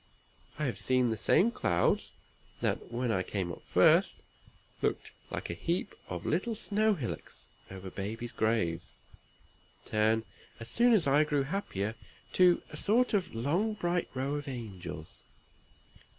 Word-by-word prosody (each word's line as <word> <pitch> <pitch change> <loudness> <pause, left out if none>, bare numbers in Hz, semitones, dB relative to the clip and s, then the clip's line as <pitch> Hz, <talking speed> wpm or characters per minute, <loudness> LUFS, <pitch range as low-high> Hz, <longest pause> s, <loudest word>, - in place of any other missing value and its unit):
I 150 - -1
have 125 - -2
seen 130 -2 +2
the - - 0
same 185 - +3
clouds, 85 - +1 0.5
that, - - -1
when 120 0 0
I 95 - +1
came 95 -1 -2
up - - -8
first, - - +4 0.6
looked - - -1 0.2
like - - -4
a - - -2
heap 170 - -2 0.2
of - - -5
little 205 +8 0
snow 215 0 +1
hillocks 130 -9 -6 0.2
over 95 0 -8
babies' 115 +4 -4
graves, 110 -7 0 0.9
turn, 110 +1 +2 0.4
as 115 0 -6
soon 240 - +4
as 205 -7 +4
I 140 +2 +5
grew 145 -2 +1
happier, 125 - -2 0.4
to 180 -1 +5
a - - -7
sort 235 +4 +2
of 190 - 0
long 170 - +1
bright 175 -3 -1
row 135 +2 -1
of 145 0 -4
angels. 105 - -7
130 Hz, 145 wpm, -31 LUFS, 110-180 Hz, 0.9 s, I